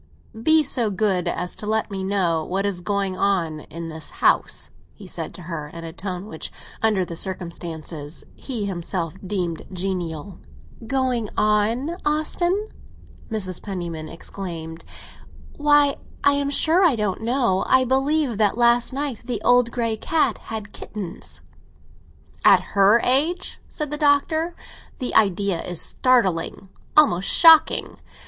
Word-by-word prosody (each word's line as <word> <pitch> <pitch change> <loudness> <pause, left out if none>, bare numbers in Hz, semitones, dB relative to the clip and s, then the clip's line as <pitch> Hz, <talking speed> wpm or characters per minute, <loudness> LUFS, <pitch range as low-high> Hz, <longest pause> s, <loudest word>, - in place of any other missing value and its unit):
"Be 315 +4 +5
so 240 -6 +2
good 195 -3 0
as 180 0 -3
to 210 - -6
let 220 0 0
me 190 -1 -4
know 180 -5 0
what 190 +4 -2
is 195 -3 -2
going 200 0 -1
on 175 -6 0
in 165 +2 -8
the 160 0 -7
house," 155 - +1 0.2
he - - -12
said - - -4
to 180 - -9
her, 160 -3 -5
in 165 +2 -10
a 165 -1 -7
tone 185 0 -5
which, 160 -7 -6 0.3
under 210 -4 +2
the 170 - -7
circumstances, 165 -4 -5
he 235 -7 -4
himself 175 -3 -3
deemed 180 -4 -3
genial. 180 -1 -4 0.5
"Going 255 -4 0
on, 225 +10 +1
Austin?" 345 +7 0 0.6
Mrs. 190 -5 -2
Penniman 170 -5 -5
exclaimed. 165 -2 -7 0.7
"Why, 290 -1 +4 0.3
I 285 - +6
am 280 0 0
sure 325 +6 +3
I 330 -8 +4
don't 210 -3 -2
know! 235 -5 +1
I 260 0 +4
believe 270 -2 +1
that 210 0 +2
last 240 +1 +3
night 275 -4 -3
the 240 -3 -2
old 245 -1 +4
grey 230 -2 -2
cat 320 +7 0
had 220 -2 -6
kittens!" 195 -5 -7 1.0
"At - - +7
her 200 +3 +5
age?" 320 +8 +2
said 300 -3 -4
the 300 - -1
Doctor. 315 +3 +2 0.4
"The 250 - -2
idea 200 -3 +2
is 180 -2 0
startling—almost 195 - +2
shocking. 325 -2 +5
205 Hz, 140 wpm, -22 LUFS, 180-260 Hz, 1.0 s, At